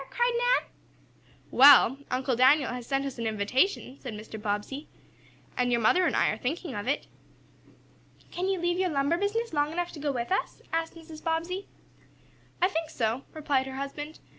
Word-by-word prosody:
cried 485 0 +1
Nan. - - +2 0.8
"Well, 275 -1 +7
Uncle 255 0 0
Daniel 265 +4 +4
has 245 -1 -6
sent 275 0 0
us 270 -3 -6
an 230 - -1
invitation," 255 - 0
said 245 -5 -6
Mr. 215 0 -9
Bobbsey, 210 +8 -3 0.7
"and 245 0 +1
your 240 - +3
mother 345 +11 +4
and - - 0
I - - +3
are - - -3
thinking 310 +3 -3
of 205 +1 -5
it." 280 - 0 1.3
"Can 365 +2 -2
you 385 0 +1
leave 350 +1 0
your 375 -1 +1
lumber 285 +2 +1
business 440 +1 -1
long 295 0 +1
enough 350 +1 -2
to 305 - -10
go 290 0 -1
with 240 +1 -4
us?" 385 - -2
asked 330 0 -1
Mrs. 320 -1 -12
Bobbsey. 340 +4 -2 1.0
"I - - +7
think 325 -4 -3
so," 230 +3 -2
replied 285 -4 0
her 265 - -7
husband. 290 +3 -6
285 Hz, 180 wpm, -28 LUFS, 250-345 Hz, 1.3 s, Well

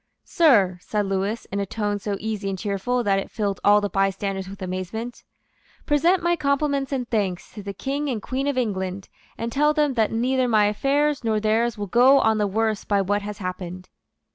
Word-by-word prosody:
"Sir," 205 - +3
said 210 +1 -1
Lewis, 195 +3 -2
in 200 - -2
a 200 - -1
tone 205 0 -2
so 200 0 -3
easy 215 -2 -3
and 190 - -3
cheerful 210 +5 -1
that 195 -2 +2
it - - -6
filled 200 -4 -2
all 205 0 +5
the 205 - 0
bystanders 195 0 -1
with 195 - -10
amazement, 185 +6 -5 0.6
"present 335 +5 +2
my 345 0 +3
compliments 280 -2 0
and 255 -3 -2
thanks 200 -6 -2
to 210 - -8
the 200 0 -5
King 280 +8 -3
and 240 -4 -2
Queen 260 +6 -3
of 285 -2 -1
England, 190 -5 -2 0.3
and 230 0 -3
tell 300 +3 +2
them 295 -3 +2
that 225 -4 +1
neither 255 +3 +1
my 215 -3 +4
affairs 280 +7 +1
nor 220 -2 +1
theirs 220 +2 +1
will 205 - -3
go 250 +7 +5
on 220 -1 +2
the 210 - +2
worse 215 +1 0
by 200 -1 +1
what 205 +2 0
has 205 0 -6
happened." 185 -1 -6
215 Hz, 200 wpm, -23 LUFS, 195-255 Hz, 0.6 s, all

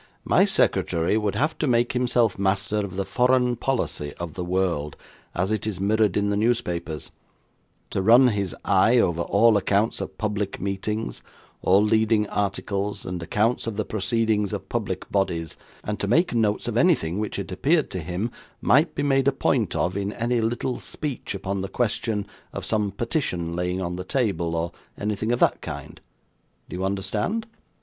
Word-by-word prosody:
'My - - +5
secretary 85 +4 +1
would 105 -2 0
have 150 +8 +1
to 155 - 0
make 120 -1 +2
himself 120 -4 +1
master 100 +2 +1
of 100 -3 -2
the 100 0 -1
foreign 125 +1 +2
policy 115 - -2
of 85 -3 -6
the 90 - -4
world, 90 -5 -1 0.4
as 90 +4 0
it 110 0 -1
is 100 -4 -3
mirrored 105 0 +2
in 100 0 +1
the - - +1
newspapers; 90 -8 -1 0.8
to - - 0
run 120 +6 +7
his 100 -5 -2
eye 110 +6 +4
over 85 -7 +2
all 110 +4 +4
accounts 100 +2 +1
of - - -6
public 105 -2 -2
meetings, 100 +3 -3 0.4
all 95 +3 +4
leading 110 0 +3
articles, 100 0 -2
and 90 -1 -4
accounts 110 +8 0
of 110 -2 -3
the 110 - -1
proceedings 110 0 0
of - - -5
public - - -3
bodies; 85 -5 -1 0.3
and 105 0 -3
to 100 - -1
make 165 - +3
notes 110 -3 +1
of - - -1
anything 80 +5 +2
which 105 - -3
it 100 -1 -5
appeared 150 - +1
to 95 - -3
him 90 +8 -3 0.3
might 150 +7 +3
be 145 - -1
made 135 -1 +2
a - - +6
point 130 -4 0
of, 90 +1 0
in 100 0 -2
any 120 0 0
little 120 +3 -1
speech 140 -8 -4
upon 95 0 -3
the 95 - -4
question 115 -3 -1 0.3
of - - -4
some 105 -2 +1
petition 95 - -2
lying 90 +1 -1
on 90 -1 -3
the 90 - -4
table, 90 -8 0
or 85 +1 -1 0.3
anything 105 +2 -1
of 120 - +1
that - - +3
kind. - - -7 0.7
Do - - -6
you 95 - -3
understand? 105 - -1
105 Hz, 175 wpm, -24 LUFS, 95-115 Hz, 0.8 s, run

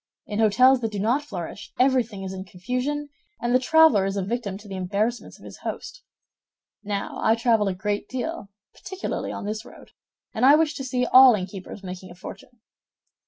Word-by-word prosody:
In 210 0 -4
hôtels 245 +4 +5
that 225 -2 -2
do 205 - -5
not 230 +8 +1
flourish, 200 - -7
everything 250 -6 +2
is 190 0 -5
in 190 0 -6
confusion, 250 +11 -3 0.3
and 240 0 -1
the 255 - +5
traveler 315 -6 +5
is 195 +1 -2
a 195 - -1
victim 205 -3 -3
to 210 +1 -14
the 195 - -6
embarrassments 200 +6 -2
of - - -16
his - - -11
host. - - -6 0.8
Now, 205 -1 -4
I 220 - +4
travel 230 -3 +2
a 190 - -1
great 205 +2 -3
deal, 260 -3 -4 0.2
particularly 380 0 -5
on - - -6
this 215 +1 -4
road, - - -15 0.4
and 220 - -2
I 275 +3 +8
wish 315 -1 +2
to 270 - -5
see 250 -1 -1
all 255 -1 +8
innkeepers 190 +1 -7
making 185 0 -8
a 175 - -12
fortune." 235 +5 -11
225 Hz, 190 wpm, -24 LUFS, 200-255 Hz, 0.8 s, I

